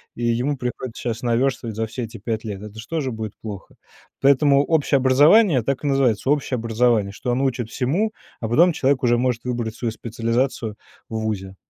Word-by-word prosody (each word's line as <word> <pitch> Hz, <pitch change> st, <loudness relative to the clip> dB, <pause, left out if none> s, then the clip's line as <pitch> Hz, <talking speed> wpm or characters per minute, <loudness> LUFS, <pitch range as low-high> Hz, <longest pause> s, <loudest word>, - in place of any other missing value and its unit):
и 120 Hz, -, -3 dB
ему 125 Hz, +5 st, 0 dB
приходится 125 Hz, -1 st, -5 dB
щас 115 Hz, -1 st, -3 dB
наверстывать 120 Hz, -2 st, 0 dB
за 110 Hz, 0 st, -1 dB
все 125 Hz, +3 st, -5 dB
эти 115 Hz, -, -7 dB
5 110 Hz, +1 st, -3 dB
лет. 105 Hz, -3 st, -6 dB
Это 105 Hz, +1 st, -10 dB
же 110 Hz, -, -8 dB
тоже 150 Hz, -6 st, -1 dB
будет 110 Hz, -1 st, -5 dB
плохо. 100 Hz, -3 st, -8 dB, 0.5 s
Поэтому 140 Hz, +1 st, +4 dB
общее 145 Hz, -3 st, +2 dB
образование 145 Hz, -, +5 dB
так 135 Hz, +4 st, -2 dB
и -, -, +1 dB
называется 135 Hz, -3 st, +1 dB
общее 140 Hz, -3 st, +1 dB
образование, 115 Hz, -3 st, +1 dB
что 125 Hz, -, -3 dB
оно 130 Hz, +3 st, +1 dB
учит 120 Hz, -3 st, -2 dB
всему, 165 Hz, -, 0 dB, 0.3 s
а 110 Hz, -, -3 dB
потом 170 Hz, +8 st, +5 dB
человек 135 Hz, -1 st, +1 dB
уже 120 Hz, -1 st, +3 dB
может 125 Hz, -1 st, -1 dB
выбрать 120 Hz, -3 st, -3 dB
свою 115 Hz, -2 st, -3 dB
специализацию 115 Hz, 0 st, -2 dB, 0.3 s
в 110 Hz, -, -3 dB
вузе. 100 Hz, -3 st, -3 dB
120 Hz, 190 wpm, -22 LUFS, 110-135 Hz, 0.5 s, образование